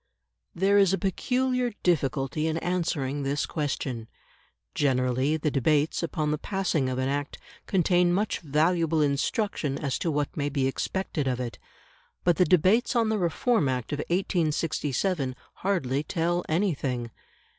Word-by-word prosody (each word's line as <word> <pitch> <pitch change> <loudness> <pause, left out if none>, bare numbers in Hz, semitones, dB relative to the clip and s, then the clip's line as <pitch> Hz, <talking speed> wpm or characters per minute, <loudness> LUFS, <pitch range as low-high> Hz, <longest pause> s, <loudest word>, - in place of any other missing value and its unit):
There 195 +3 +4
is 195 -2 +4
a - - +2
peculiar 250 +5 0
difficulty 145 -2 +1
in 160 0 0
answering 160 -6 -1
this 140 +1 -1
question. 135 -6 -3 0.7
Generally, 130 +1 +1
the 150 -1 -1
debates 145 +3 +1
upon 155 -3 -1
the 150 - -1
passing 175 -8 0
of 130 - -2
an 130 0 0
Act 145 +1 -2 0.3
contain 180 -1 +3
much 200 +4 0
valuable 160 +1 +2
instruction 145 +1 0
as 140 -3 -2
to 170 - -1
what 145 -2 -1
may 145 -2 -1
be 140 -2 0
expected 150 +2 -2
of 125 -1 0
it. 120 -2 -5 0.6
But 175 -3 +3
the 180 - +5
debates 190 - +3
on 230 -2 +3
the 220 -1 0
Reform 175 - +1
Act 125 +1 -2
of 145 - -2
1867 160 -4 0 0.2
hardly 150 -9 0
tell 175 +2 -1
anything. 140 - -1
155 Hz, 145 wpm, -27 LUFS, 140-180 Hz, 0.7 s, the